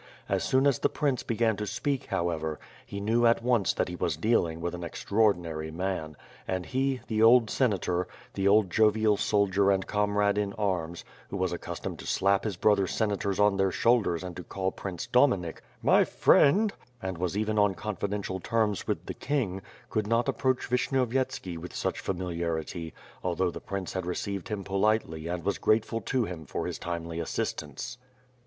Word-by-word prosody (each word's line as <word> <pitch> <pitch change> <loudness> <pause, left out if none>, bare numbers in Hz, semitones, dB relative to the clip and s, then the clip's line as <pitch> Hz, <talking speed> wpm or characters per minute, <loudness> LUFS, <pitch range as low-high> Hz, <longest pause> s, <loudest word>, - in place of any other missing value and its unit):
As - - 0
soon 130 +1 +3
as 140 -3 +3
the - - +2
prince 140 -4 0
began 115 -1 +1
to 105 0 -3
speak 130 +4 -2
however, 80 -4 -1 0.3
he 100 - -5
knew 115 +4 +3
at 115 0 +3
once 120 -5 +3
that - - 0
he 90 - -5
was 85 -4 -1
dealing 85 -4 +1
with 85 +1 -3
an 90 0 -6
extraordinary 85 -4 0
man 80 -2 -3 0.3
and 95 -1 -2
he, 130 0 0
the 110 -1 -1
old 115 0 +6
Senator, 90 -7 +1 0.3
the 95 0 0
old 100 -2 +4
jovial 110 0 +4
soldier 100 -1 +2
and 95 -1 +2
comrade 105 0 +1
in 100 -1 -1
arms, 90 -6 -2 0.2
who - - -4
was - - 0
accustomed - - -5
to - - -8
slap 100 +2 +2
his 100 -5 -2
brother 100 -1 +3
senators 100 -2 -1
on 105 -1 +4
their 95 0 +3
shoulders 100 -6 +2
and 90 -2 -6
to 90 - -6
call 95 +1 -2
Prince 95 0 -5
Dominik 115 - +2 0.2
*^my - - +6
friend," 205 +9 +4 0.3
and 95 -5 -4
was 90 +2 -1
even 110 0 +1
on 105 -2 +3
confidential 100 -1 -3
terms 110 0 0
with - - -2
the - - -4
king, 120 -10 -2 0.3
could 110 -2 0
not 115 +2 +2
approaxih 130 -2 0
Vishnyovyet«^ki 125 -7 0
with 90 +1 -8
such - - -2
familiarity 85 -2 -3 0.3
although 90 0 0
the - - -8
prince 95 -2 -4
had 95 -2 -3
received 100 +2 -3
him 105 -2 -3
politely 100 -5 0
and 85 0 -3
was 100 - 0
grateful 110 +1 +1
to 125 +3 0
him 90 -5 -6
for - - -3
his - - -4
timely 85 -1 -4
assistance. 80 - -4
100 Hz, 175 wpm, -28 LUFS, 90-110 Hz, 0.3 s, old